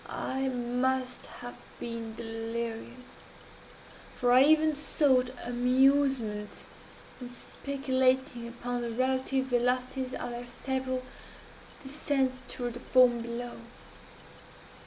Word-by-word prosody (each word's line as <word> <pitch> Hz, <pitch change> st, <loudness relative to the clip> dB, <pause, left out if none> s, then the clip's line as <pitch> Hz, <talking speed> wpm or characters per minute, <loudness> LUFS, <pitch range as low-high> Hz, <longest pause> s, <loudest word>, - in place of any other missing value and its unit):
I 265 Hz, 0 st, -2 dB
must 250 Hz, +1 st, -1 dB
have 245 Hz, 0 st, -8 dB, 0.3 s
been 230 Hz, -1 st, -5 dB
delirious 230 Hz, +2 st, -5 dB, 1.1 s
for 245 Hz, 0 st, +2 dB
I 250 Hz, +1 st, +8 dB
even 310 Hz, +2 st, +5 dB
sought 275 Hz, -4 st, +2 dB, 0.2 s
amusement 250 Hz, -3 st, +2 dB, 0.6 s
in 245 Hz, -, -6 dB
speculating 260 Hz, -1 st, 0 dB
upon 245 Hz, +1 st, -4 dB
the 235 Hz, -, -2 dB
relative 260 Hz, +2 st, 0 dB
velocities 255 Hz, +1 st, 0 dB
of 245 Hz, -, -4 dB
their 240 Hz, 0 st, -6 dB
several 260 Hz, +1 st, -2 dB, 0.8 s
descents 270 Hz, -2 st, 0 dB
toward 245 Hz, -1 st, -4 dB
the 245 Hz, -, -7 dB
foam 250 Hz, -1 st, +5 dB
below. 235 Hz, +1 st, -5 dB
250 Hz, 95 wpm, -30 LUFS, 240-265 Hz, 1.1 s, I